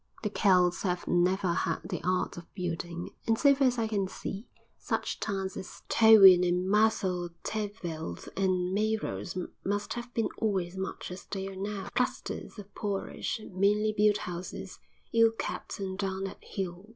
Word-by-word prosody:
The 210 - -1
Celts 180 -4 +3
have 180 -2 -1
never 180 +1 +2
had 165 -1 -1
the 180 -4 -4
art 185 0 0
of 170 -1 -11
building, 175 -2 -4 0.2
and 225 0 +3
so 280 +2 +6
far 275 -1 +3
as 250 -1 +1
I 225 - +1
can 200 -3 0
see, 195 +4 -6 0.3
such - - -2
towns 195 -2 -2
as 190 - -8
Towy 220 -4 +9
and 180 +1 +1
Merthyr 195 -4 +2
Tegveth 180 - -4
and 185 -1 +1
Meiros 215 -3 -1 0.3
must 205 +1 -1
have 240 0 -6
been 225 - +1
always 190 -5 0
much 190 -1 -5
as 180 - -8
they 195 -1 -4
are 195 - -9
now, 200 +1 -4
clusters 250 -1 -2
of 200 -1 -10
poorish, 205 +2 -3
meanly 210 +3 +2
built 210 0 +4
houses, 180 -2 -6 0.3
ill 230 -1 +5
kept - - -4
and 190 -1 -4
down 195 -1 -2
at 195 - -8
heel. 190 +1 -5
195 Hz, 165 wpm, -30 LUFS, 180-215 Hz, 0.3 s, Towy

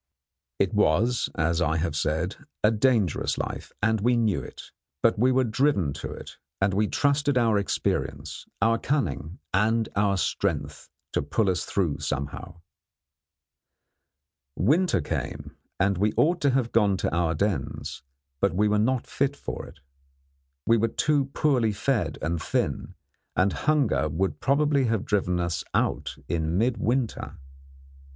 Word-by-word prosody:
It - - +1
was, 115 +10 +2
as 85 +2 +1
I 80 -1 +1
have 80 -1 -1
said, 80 +5 -1 0.3
a 105 - +5
dangerous 110 - +1
life, - - -5
and 110 -1 +2
we 120 +2 +3
knew 110 -6 +1
it; - - -11 0.3
but 115 -2 +3
we 125 +3 +4
were 130 0 +3
driven 110 - +1
to - - -5
it, - - -10 0.2
and 95 0 +2
we 105 +2 +2
trusted 145 +1 +1
to 125 - +4
our 110 -3 +3
experience, 100 - -2 0.2
our 115 0 +3
cunning, 95 - -2 0.2
and 110 +3 +2
our 100 -1 +2
strength, - - -2 0.2
to - - +1
pull 95 +8 +1
us 85 -1 -2
through 85 -8 -1
somehow. 80 +5 -5 1.9
Winter 150 - +2
came, - - -4 0.2
and 95 -1 +2
we 105 +2 +2
ought 170 +2 +3
to 145 - +3
have 130 -3 +1
gone 105 -4 +3
to 80 - -1
our 85 -1 +1
dens, 90 -8 -2 0.4
but 100 0 +1
we 105 +3 +3
were 105 0 +2
not 125 +3 +1
fit 140 0 -1
for - - -6
it. - - -16 0.8
We 115 - +4
were 115 +1 +2
too 145 +4 +1
poorly 130 -5 +1
fed 120 +3 -1
and 85 0 -1
thin, - - -2 0.4
and 95 0 +2
hunger 125 - +1
would 95 +6 -1
probably 140 0 +2
have 115 -3 0
driven 90 -3 0
us 85 -3 -1
out - - 0
in 80 0 -1
midwinter. 120 +2 -1
105 Hz, 150 wpm, -26 LUFS, 90-125 Hz, 1.9 s, a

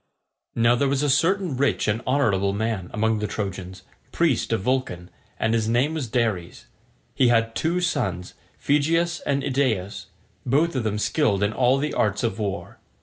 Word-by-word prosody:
Now 115 +1 +4
there 140 +3 +1
was 140 +1 0
a 145 - +2
certain 175 +2 +1
rich 140 +2 0
and 105 +2 0
honourable 100 -8 +1
man 105 -3 -2
among 110 0 0
the 105 - -2
Trojans, 95 -3 -5 0.3
priest 160 -10 +1
of 115 - 0
Vulcan, 105 -7 -2 0.3
and 110 0 +1
his 110 -1 0
name 125 +7 +2
was 150 -6 -3
Dares. 110 -7 -2 0.5
He 130 - +3
had 115 -1 +2
two 170 +7 0
sons, 125 - -2 0.2
Phegeus 165 +4 +1
and 140 -1 0
Idaeus, 125 -8 -1 0.4
both 150 +6 +1
of 130 - 0
them 105 -1 -1
skilled 105 -3 +1
in 105 +1 0
all 130 +2 +3
the 150 +2 -2
arts 105 +2 0
of 115 -1 -1
war. 100 -2 -4
120 Hz, 170 wpm, -24 LUFS, 105-140 Hz, 0.5 s, Now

